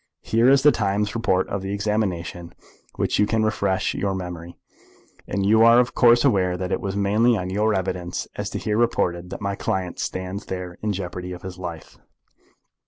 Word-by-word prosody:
Here 115 Hz, +3 st, +3 dB
is 140 Hz, 0 st, +5 dB
the 150 Hz, -, +7 dB
Times 105 Hz, -2 st, -1 dB
report 95 Hz, -5 st, +1 dB
of 100 Hz, -, -3 dB
the 95 Hz, +1 st, -3 dB
examination, 95 Hz, -5 st, -2 dB
with -, -, -28 dB
which -, -, 0 dB
you 105 Hz, -, +4 dB
can 110 Hz, 0 st, +1 dB
refresh 110 Hz, -3 st, 0 dB
your 95 Hz, 0 st, -1 dB
memory, 85 Hz, -2 st, -7 dB, 0.7 s
and 95 Hz, +1 st, -1 dB
you 110 Hz, +2 st, +5 dB
are 115 Hz, +1 st, +7 dB
of 120 Hz, -2 st, +1 dB
course 120 Hz, +2 st, +5 dB
aware 95 Hz, -8 st, +2 dB
that 90 Hz, +1 st, -4 dB
it -, -, -1 dB
was 100 Hz, -1 st, -3 dB
mainly 105 Hz, +4 st, +3 dB
on 90 Hz, -1 st, -4 dB
your 105 Hz, +2 st, +1 dB
evidence 90 Hz, -2 st, -3 dB
as -, -, -4 dB
here 105 Hz, 0 st, -2 dB
reported 90 Hz, -7 st, 0 dB
that -, -, -7 dB
my 100 Hz, -1 st, -1 dB
client 95 Hz, -2 st, -3 dB
stands 95 Hz, +3 st, -4 dB
there 90 Hz, -1 st, -6 dB
in 105 Hz, -, -1 dB
jeopardy 90 Hz, -1 st, -5 dB
of 90 Hz, -, -10 dB
his 95 Hz, -1 st, -8 dB
life." 85 Hz, -3 st, -8 dB
95 Hz, 190 wpm, -23 LUFS, 90-110 Hz, 0.7 s, the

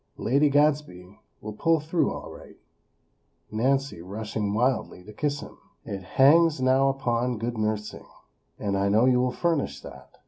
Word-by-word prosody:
Lady 140 Hz, +5 st, +2 dB
Gadsby 145 Hz, -11 st, 0 dB, 0.2 s
will 105 Hz, 0 st, -7 dB
pull 165 Hz, +9 st, +2 dB
through 160 Hz, +3 st, 0 dB
all -, -, -7 dB
right," -, -, -14 dB, 0.9 s
(Nancy 135 Hz, -1 st, 0 dB
rushing 105 Hz, +2 st, -4 dB
wildly 115 Hz, -4 st, -1 dB
to 105 Hz, +3 st, -12 dB
kiss 145 Hz, +5 st, -2 dB
him!) -, -, -12 dB, 0.3 s
"it 100 Hz, -1 st, -5 dB
hangs 150 Hz, -, +4 dB
now 130 Hz, +1 st, +3 dB
upon 125 Hz, -3 st, -1 dB
good 120 Hz, +2 st, -3 dB
nursing; 110 Hz, -1 st, -3 dB, 0.5 s
and 100 Hz, -1 st, -2 dB
I 100 Hz, +1 st, +1 dB
know 110 Hz, +4 st, +4 dB
you 125 Hz, -1 st, +3 dB
will 125 Hz, 0 st, +1 dB
furnish 165 Hz, -2 st, -1 dB
that. -, -, -12 dB
125 Hz, 150 wpm, -26 LUFS, 105-140 Hz, 0.9 s, hangs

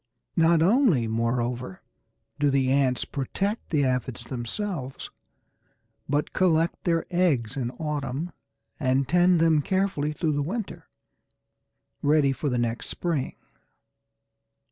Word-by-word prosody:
Not 165 Hz, -1 st, +4 dB
only, 190 Hz, -, +4 dB
moreover, 115 Hz, -1 st, -2 dB, 0.6 s
do 145 Hz, -1 st, +3 dB
the 135 Hz, -1 st, +2 dB
ants 135 Hz, -2 st, +2 dB
protect 195 Hz, -, -3 dB
the 145 Hz, -4 st, +2 dB
Aphides 125 Hz, -1 st, -2 dB
themselves, 130 Hz, -, -4 dB, 1.0 s
but 145 Hz, +1 st, 0 dB
collect 165 Hz, -2 st, +1 dB
their 165 Hz, -2 st, +1 dB
eggs 150 Hz, -10 st, +1 dB
in 125 Hz, -4 st, -2 dB
autumn, 150 Hz, +1 st, -3 dB, 0.5 s
and 130 Hz, -2 st, +1 dB
tend 175 Hz, +2 st, +4 dB
them 160 Hz, -2 st, +4 dB
carefully 185 Hz, -4 st, 0 dB
through 155 Hz, 0 st, -1 dB
the 145 Hz, -, 0 dB
winter, 200 Hz, +8 st, -5 dB, 1.1 s
ready 145 Hz, -1 st, +3 dB
for 145 Hz, +2 st, -2 dB
the 125 Hz, -, 0 dB
next 120 Hz, -1 st, -2 dB
spring. 165 Hz, -7 st, -2 dB
145 Hz, 115 wpm, -26 LUFS, 130-170 Hz, 1.1 s, Not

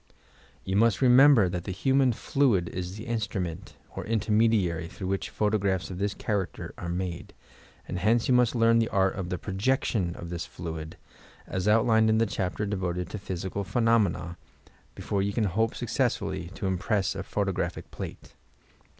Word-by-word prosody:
Tou 95 Hz, -, -1 dB
must 110 Hz, -1 st, +3 dB
remember 130 Hz, -4 st, +7 dB
that 90 Hz, -1 st, -4 dB
the -, -, -3 dB
human 130 Hz, +6 st, +2 dB
fiuid 115 Hz, -7 st, +1 dB
is 90 Hz, +1 st, -5 dB
the 110 Hz, -, -7 dB
instrument 100 Hz, -6 st, -3 dB, 0.2 s
or -, -, -4 dB
intermediary, 105 Hz, -6 st, +1 dB
through 95 Hz, -, -8 dB
which 95 Hz, +1 st, -2 dB
photographs 100 Hz, -3 st, 0 dB
of 90 Hz, -, -6 dB
this 100 Hz, 0 st, -1 dB
character 100 Hz, -6 st, -3 dB
are 85 Hz, -, -6 dB
made, 90 Hz, -1 st, -4 dB, 0.5 s
and 90 Hz, -, -3 dB
hence 110 Hz, +5 st, +2 dB
you 130 Hz, -, +3 dB
must 125 Hz, -1 st, +3 dB
learn 115 Hz, 0 st, +4 dB
the 115 Hz, -, +1 dB
art 95 Hz, -1 st, +2 dB
of 95 Hz, -4 st, -5 dB
the 90 Hz, -, -2 dB
projection 100 Hz, -2 st, 0 dB
of 85 Hz, 0 st, -8 dB
this 85 Hz, -1 st, -4 dB
fluid, 80 Hz, -1 st, -7 dB, 0.5 s
as 95 Hz, +1 st, -3 dB
outlined 110 Hz, 0 st, +4 dB
in 110 Hz, -, +3 dB
the 115 Hz, -, +3 dB
chapter 100 Hz, 0 st, -2 dB
devoted 90 Hz, -3 st, -3 dB
to 105 Hz, -, -5 dB
"Physical 95 Hz, +1 st, -4 dB
Phenomena," 110 Hz, -6 st, +1 dB, 0.6 s
before 100 Hz, -, -2 dB
you 100 Hz, +1 st, -1 dB
can 115 Hz, -, 0 dB
hope 110 Hz, +4 st, 0 dB
successfully 85 Hz, -, -1 dB
to -, -, -5 dB
impress 95 Hz, +1 st, 0 dB
a -, -, -4 dB
photographic -, -, -3 dB
plate. -, -, -8 dB
100 Hz, 165 wpm, -27 LUFS, 90-115 Hz, 0.6 s, remember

